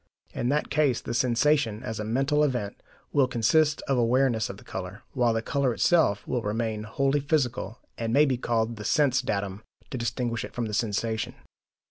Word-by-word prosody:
In 120 - -1
that 150 +1 0
case 145 -4 +2
the - - -5
sensation, 120 -1 +2
as 110 -4 -4
a - - -2
mental 135 +7 +1
event, 125 -8 -2 0.3
will 140 -3 +4
consist 145 +6 +2
of 135 -2 +2
awareness 120 -1 +2
of 95 - -7
the - - -15
colour, 95 +5 -7
while 120 -3 +2
the 115 0 -1
colour 135 -3 0
itself 130 - +2
will 125 - -1
remain 110 0 -2
wholly 135 +6 +1
physical, 135 -5 -1 0.2
and 115 -1 -2
may 145 +5 +5
be 135 -3 +1
called 115 -1 -1
the 105 - -7
sense 135 +2 +2
datum, 100 -1 -3 0.3
to 130 - -3
distinguish 115 0 -2
it - - -9
from 120 - -1
the 105 - -5
sensation. 110 +1 -1
120 Hz, 185 wpm, -27 LUFS, 110-135 Hz, 0.3 s, may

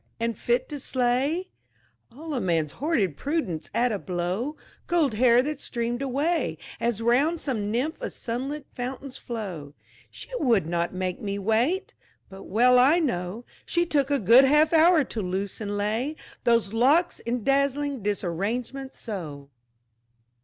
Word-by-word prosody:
and 230 0 -1
fit 240 +4 0
to 290 - -6
slay 265 +8 0 0.6
All 305 +6 -7
a 255 - -1
man's 165 -5 0
hoarded 210 - 0
prudence 275 - -2
at 245 +1 +1
a 205 - -2
blow: 185 - -2 0.3
Gold 320 -8 +2
hair 240 +2 +5
that 295 0 -4
streamed 240 +1 -3
away 285 +6 0 0.2
As 230 -1 -1
round 280 +8 +3
some 220 -9 -2
nymph 275 - -2
a - - -3
sunlit 270 +5 -4
fountain's 255 +2 -6
flow. 180 - -6 0.3
"She - - -9
would 230 - +3
not 170 +1 -1
make 185 -1 -3
me 200 -1 -3
wait!" 245 - 0 0.4
but 195 0 -11
well 250 +4 +4
I 275 +7 +5
know 230 - -2 0.2
She 345 0 +1
took 285 -4 +1
a 285 - +2
good 235 +4 +7
half 300 +4 +4
hour 325 0 +6
to 230 -4 -5
loose 190 +3 -3
and 205 -1 -3
lay 225 +9 -1 0.3
Those 230 -3 +2
locks 285 +10 +3
in 235 -1 -3
dazzling 280 0 +1
disarrangement 210 +7 -3
so! 150 - -7
240 Hz, 150 wpm, -26 LUFS, 205-285 Hz, 0.6 s, good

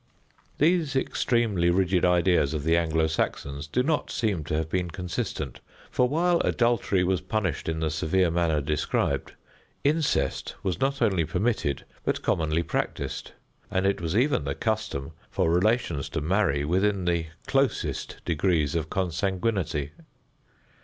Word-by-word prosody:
These 160 -2 +2
extremely 115 -9 +1
rigid 90 0 +2
ideas 90 -4 +3
of 75 - -3
the 80 +2 +3
Anglo 80 -1 +2
Saxons 70 -2 -2
do 125 +11 +1
not 150 +2 0
seem 100 -9 -1
to 75 - -2
have 80 0 -1
been 90 +1 -1
consistent, 90 - -4 0.3
for 125 0 +2
while 170 +4 +2
adultery 115 -6 +2
was 90 0 +1
punished 95 -8 -2
in 80 0 -2
the 80 -1 0
severe 85 +2 +1
manner 85 -3 +1
described, 75 +1 -1 0.5
incest 150 +2 0
was 95 -3 -1
not 135 -1 +1
only 95 -7 +2
permitted, 90 - -1 0.2
but - - -1
commonly 80 0 +1
practiced; - - -3 0.4
and 95 -1 0
it 100 -2 +1
was 85 +4 -1
even 125 - +2
the 70 0 -2
custom 110 - -2 0.2
for 80 - +1
relations 90 - +1
to - - -2
marry 80 -3 +1
within 95 +3 +1
the 85 -2 0 0.2
closest 135 -1 -1
degrees 80 -3 +1
of 80 -2 -2
consanguinity. 95 -4 -1
90 Hz, 140 wpm, -26 LUFS, 80-110 Hz, 0.5 s, ideas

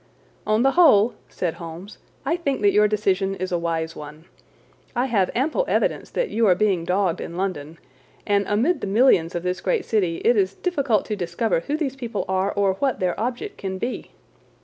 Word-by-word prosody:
"On 215 +2 +2
the 270 - +4
whole," 245 - +5 0.2
said 175 -3 -2
Holmes, 170 +4 -10 0.3
"I 330 - +1
think 280 -9 -2
that 205 -1 +4
your 210 +1 +4
decision 195 -2 0
is 185 0 -4
a 175 - 0
wise 165 -1 -2
one. 150 +2 -10 0.7
I 245 +2 +1
have 210 -8 +1
ample 310 - +1
evidence - - 0
that - - -2
you 225 -1 +2
are 180 - +5
being 190 -4 +1
dogged 185 -1 0
in 170 - -7
London, 165 -5 -3 0.5
and 200 -1 +1
amid 260 +11 +1
the - - -3
millions 195 -6 +3
of 175 - -3
this 180 0 -2
great 460 -6 0
city 185 -7 0
it 240 - +5
is 195 -2 +1
difficult 280 - 0
to 215 - -3
discover 175 +2 -1
who 290 - -3
these 275 -4 -2
people 235 -5 -4
are 190 +1 0
or 200 -1 +2
what 275 -2 0
their 180 -1 0
object 250 - -4
can 190 -1 -4
be. 240 +6 -4
200 Hz, 195 wpm, -23 LUFS, 180-245 Hz, 0.7 s, whole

